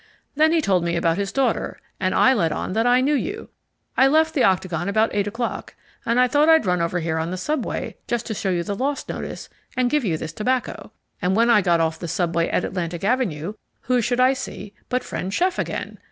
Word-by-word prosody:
Then 310 +2 +4
he 330 -1 +3
told 185 - +2
me 170 0 -1
about 170 +1 +1
his 200 -1 -2
daughter, 265 -4 -1 0.2
and 185 -1 0
I 260 - +5
let 170 -10 +1
on 185 - -3
that 225 +3 +1
I 250 +1 +4
knew 285 +3 +2
you. 390 - -3 0.5
I 265 - +5
left 320 +3 +3
the 280 - +2
Octagon 185 -1 +1
about 220 +2 +2
eight 205 0 0
o'clock, 230 +3 -4 0.3
and 235 +2 +2
I 250 - +5
thought 295 +5 +3
I'd 320 -7 +5
run 180 -2 +1
over 170 +1 -1
here 160 0 -1
on 160 +1 -2
the 185 - -4
subway 300 +12 -3
just 240 -1 -1
to 225 - -3
show 195 -1 -2
you 175 -2 0
the 200 +3 -3
LOST 275 +6 -2
notice - - -6 0.3
and 250 -1 +2
give 300 -2 +2
you 170 -7 0
this 155 0 -6
tobacco. 250 +6 -2 0.3
And 185 0 +1
when 230 +2 +4
I 210 - +6
got 170 -3 +2
off 160 0 -1
the 170 - -5
subway 170 0 0
at - - 0
Atlantic 175 -2 -4
Avenue, 200 - 0 0.3
who 250 0 +1
should 245 +2 0
I 255 +1 +5
see 230 -6 -7 0.2
but 250 0 0
friend 185 - -4
chef 360 - 0
again. - - -4
210 Hz, 230 wpm, -22 LUFS, 180-255 Hz, 0.5 s, I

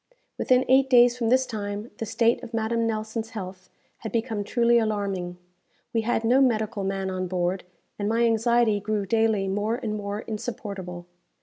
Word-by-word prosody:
Within 255 0 +3
eight 265 +1 +4
days 245 -1 +6
from 235 -2 -1
this 260 +2 +4
time 210 0 -5
the 225 - -3
state 230 +2 +2
of 230 - -7
Madame 230 +1 0
Nelson's 220 0 -3
health 185 -4 -8 0.3
had 220 - -7
become 225 -3 -1
truly 235 +2 +3
alarming. 200 -5 -2 0.6
We 225 - +2
had 225 0 0
no 250 +4 +4
medical 220 -4 +1
man 195 0 -2
on 185 0 -2
board, 180 +1 -1 0.3
and 205 0 -1
my 230 +1 +2
anxiety 230 -1 +3
grew 210 0 -2
daily 220 -1 +1
more 205 +4 0
and 235 -4 -4
more 205 0 -4
insupportable. 200 -5 -6
220 Hz, 170 wpm, -25 LUFS, 200-235 Hz, 0.6 s, days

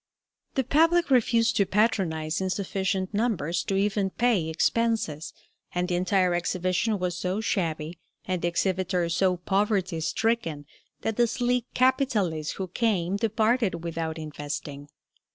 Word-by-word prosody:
The 265 - +2
public 330 +4 +3
refused 235 -2 +3
to 200 - +4
patronize 180 -7 +1
in 190 - -1
sufficient 190 0 -2
numbers 185 -7 0
to 195 - -1
even 195 0 +1
pay 210 -7 +1
expenses, 165 -3 0 0.4
and 180 0 0
the 180 - -2
entire 180 0 +2
exhibition 185 +4 0
was 180 -2 -2
so 185 +3 -2
shabby, 165 -6 -2 0.3
and 185 -4 -2
the - - +1
exhibitors 180 -1 0
so 185 0 +2
poverty 195 -1 0
stricken, 165 -4 -1 0.4
that 225 -1 -2
the 240 -1 +4
sleek 245 +1 0
capitalists 220 - +1
who 190 - -4
came 190 -3 0
departed 220 -4 +1
without 165 -1 -3
investing. 145 -2 -6
190 Hz, 135 wpm, -26 LUFS, 170-225 Hz, 0.4 s, to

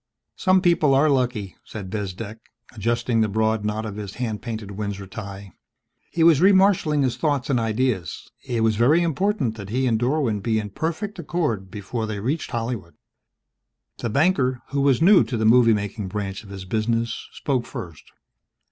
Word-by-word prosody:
"Some 185 -1 +3
people 165 -6 +4
are 145 +2 +4
lucky," 125 -8 -1
said 100 -4 -8
Bezdek, 105 +1 -5 0.3
adjusting 115 +1 0
the 110 - +2
broad 110 +1 +1
knot 105 +1 -2
of 105 -1 -6
his 100 -2 -6
hand 115 -4 -3
painted 110 -4 -5
Windsor 100 -1 -4
tie. 100 -1 -8 0.6
He 165 - 0
was 165 -4 +6
remarshaling 190 -6 +4
his 125 -2 0
thoughts 140 -2 0
and 125 - +2
ideas. 110 -6 -1 0.2
It 120 -2 -2
was 110 -2 +2
very 145 +9 +4
important 165 - 0
that 100 -2 -8
he 130 +4 0
and 115 -3 +2
Dorwin 125 -4 +1
be 110 +1 0
in 105 -2 -3
perfect 170 - -3
accord 145 - -2
before 110 +3 -4
they 105 -2 -4
reached 140 +10 -2
Hollywood. 115 -7 -4 1.0
The 120 - -2
banker, 130 - +1
who 140 0 0
was 135 +1 +3
new 195 +2 +7
to 120 - -3
the 110 - 0
movie 115 +1 +6
making 105 0 -4
branch 100 0 -4
of 100 - -14
his 95 -2 -8
business, 115 +3 -1
spoke 130 -4 -1
first. 85 -4 -8
115 Hz, 175 wpm, -23 LUFS, 105-140 Hz, 1.0 s, new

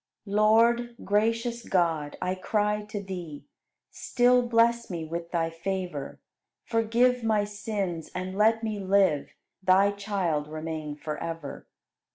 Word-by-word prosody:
71. 200 -1 -5
Lord, 235 +2 +4
gracious 230 +3 0
God, 165 -5 +1
I 180 0 0
cry 210 +2 0
to 210 -1 -5
Thee, 175 -6 -7 0.5
Still 250 0 +3
bless 235 0 +2
me 170 -3 -4
with 170 +1 -5
Thy 165 -1 -1
favor, 175 -4 -4 0.4
Forgive 235 +2 +2
my 215 -2 +2
sins, 205 -5 -4
and 185 +1 -4
let 220 +2 +3
me 215 -2 -2
live, 190 -6 +2 0.3
Thy 190 +2 +4
child 195 -7 -2
remain 155 -1 -5
forever. 155 0 -6
195 Hz, 125 wpm, -27 LUFS, 165-225 Hz, 0.5 s, Lord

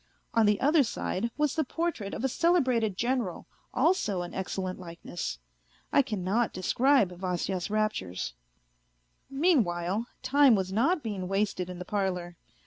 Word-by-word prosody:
On 225 -2 +4
the 210 -1 +3
other 295 +3 +4
side 230 -3 -2
was 300 -2 +1
the 315 - +1
portrait 305 -9 -3
of - - -5
a - - +3
celebrated 255 - +2
General, 240 -6 -1 0.3
also 255 - +1
an 175 - -8
excellent 185 0 -3
likeness. 170 - -6 0.6
I - - +7
cannot 215 -2 0
describe 240 +3 +3
Vasya's 180 0 -2
raptures. 210 - -1 1.0
Mean 290 -1 +4
while, 175 +5 -2 0.2
time 280 -3 +5
was 190 -1 -2
not 300 - +2
being 200 -5 -3
wasted 195 -2 -1
in 180 - -6
the 180 - -7
parlour. 180 -4 -2
210 Hz, 140 wpm, -29 LUFS, 185-265 Hz, 1.0 s, I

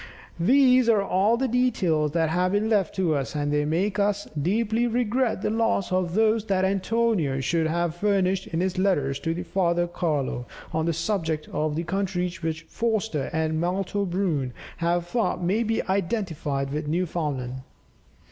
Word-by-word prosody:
These 255 +4 +5
are 210 -3 +4
all 200 +4 +2
the 265 +2 0
details 185 - +1
that 165 -2 +2
have 180 +3 +1
been 215 +2 +1
left 200 -6 +1
to 180 -5 +1
us, 140 0 -2
and 145 0 -1
they 150 0 +1
make 185 +7 0
us 205 0 0
deeply 225 +7 +1
regret 240 -2 0
the - - 0
loss 225 -4 0
of 185 -1 0
those 220 0 +3
that 190 -2 +1
Antonio 195 -7 +1
should 160 +5 +1
have 170 0 0
furnished 190 0 +1
in 165 +1 -2
his 185 0 -1
letters 145 -8 +1
to 165 - -2
his 175 +1 -5
father 175 -1 +1
Carlo, 150 -8 -2 0.3
on 160 +1 0
the - - +2
subject 165 -3 -2
of 155 -1 -1
the 165 - -1
countries 180 0 -2
which 160 0 -3
Forster 220 - -1
and 160 0 0
Malto 190 +3 -1
Brun 170 -9 -1 0.2
have 175 0 0
thought 195 -2 -1
may 195 +6 +1
be 225 -1 0
identified 170 -8 -2
with 150 0 -3
Newfoundland. 150 -6 -2
180 Hz, 165 wpm, -25 LUFS, 160-210 Hz, 0.3 s, These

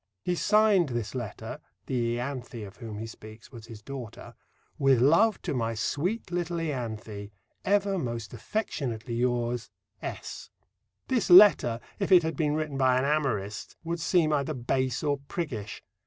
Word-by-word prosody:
He 180 - 0
signed 205 -3 +4
this 120 -4 -3
letter 120 -5 -6 0.3
(the 120 -2 0
Ianthe 125 -3 -5
of 95 - -12
whom 110 -4 -7
he 110 - -5
speaks 110 0 -12
was 115 -3 -11
his 110 -2 -11
daughter): 130 -3 -8 0.5
With 135 -3 +4
love 170 - +4
to - - -2
my 115 -3 -1
sweet 180 - -2
little 175 -1 -1
Ianthe, 110 -9 -4 0.4
ever 200 -1 +2
most 115 -6 -4
affectionately 125 - -3
yours, 120 0 0 0.3
S. - - -6 0.6
This 250 -6 0
letter, 175 - +8 0.2
if 195 - -1
it 180 -2 +8
had 160 -1 -2
been 150 0 +1
written 155 -3 -2
by 130 -1 +4
an 130 - +1
amorist, 120 -9 -1
would 170 +1 -3
seem 160 -1 +2
either 145 +1 0
base 130 +1 -1
or 145 -2 +1
priggish. 125 - -4
130 Hz, 155 wpm, -28 LUFS, 115-165 Hz, 0.6 s, letter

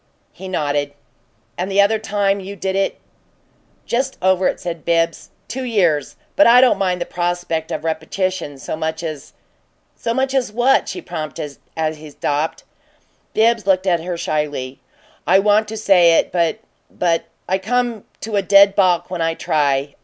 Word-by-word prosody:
He 190 - -9
nodded. 145 -5 -1 0.7
"And 185 +2 -2
the 195 +1 +1
other 215 +2 +2
time 200 -2 0
you 195 +1 -7
did 190 0 -3
it 195 0 -1 0.4
" - - -39
"Just 260 +3 -1
over 190 0 +2
it," - - -2
said 170 -3 -5
Bibbs. 165 0 0 0.2
"Two 260 +2 -4
years. 175 - +1 0.2
But 300 - +6
I 240 +1 +8
don't 250 -6 +4
mind 180 -2 0
the 175 - -2
prospect 175 -2 -2
of - - -3
a - - -2
repetition 160 -1 -2
so 135 - -5
much 160 +1 -3
as 155 -4 -6 0.3
" - - -44
"So 230 - 0
much 265 +1 0
as 255 -5 0
what?" 245 +5 +2
she 360 - -6
prompted, 150 -2 -6 0.2
as 155 -1 -1
he 155 0 -11
stopped. 145 +2 -2 0.7
Bibbs 225 -1 +2
looked 190 -1 +3
up 175 -3 +2
at - - -9
her 175 -2 -2
shyly. 145 -5 -3 0.5
"I 185 - +6
want 210 +2 +3
to 220 +1 -6
say 180 -5 +5
it, - - +1
but 170 +1 +1 0.3
but 170 -2 0 0.2
I 190 +1 +1
come 240 +1 -1 0.2
to 215 -2 -2
a - - +3
dead 200 0 +6
balk 180 -3 +2
when 180 -2 -3
I 165 0 0
try. 140 -3 0
185 Hz, 185 wpm, -19 LUFS, 160-205 Hz, 0.7 s, I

